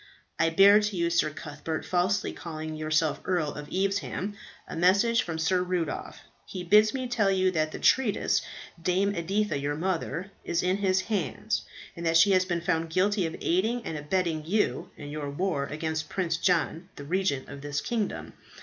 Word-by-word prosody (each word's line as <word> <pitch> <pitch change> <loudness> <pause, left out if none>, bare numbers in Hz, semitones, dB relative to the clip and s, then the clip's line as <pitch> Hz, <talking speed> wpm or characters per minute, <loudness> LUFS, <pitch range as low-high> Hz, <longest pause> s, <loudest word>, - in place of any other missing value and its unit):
"I 165 +1 +4
bear 195 +5 +7
to 210 -2 -2
you, 170 0 +1
Sir 170 -2 +2
Cuthbert, 150 +1 -5
falsely 185 +2 0
calling 155 -2 -6
yourself 155 0 0
Earl 170 -5 0
of 150 0 -8
Evesham, 195 +1 -1 0.3
a - - -7
message 200 +7 +4
from 165 -2 -4
Sir 180 +3 +1
Rudolph. 180 -3 -3 0.3
He 185 - -6
bids 210 +4 +5
me 260 -1 -3
tell 225 -5 +2
you 190 -1 +2
that 155 -2 0
the - - -6
traitress, 240 -6 +2 0.4
Dame 185 +4 +1
Editha, 195 -1 -1
your 145 +1 -2
mother, 180 +2 -2
is 170 0 -1
in 185 +1 +1
his 190 -2 +2
hands, 190 - -2 0.3
and 170 - -7
that 165 0 +3
she 200 +4 +6
has 185 -1 +4
been 175 -2 -1
found 165 -2 0
guilty 185 +2 +1
of 160 - -6
aiding 220 +8 +1
and 160 - -4
abetting 160 +1 -1
you 200 +7 0
in 145 - -8
your 145 -1 -4
war 145 -1 -1
against 155 +1 -3
Prince 170 -4 -1
John, 170 0 0
the 145 - -8
Regent 170 -3 -1
of 140 0 -9
this 145 0 -2
kingdom. 215 +6 -3
175 Hz, 180 wpm, -28 LUFS, 155-195 Hz, 0.4 s, bear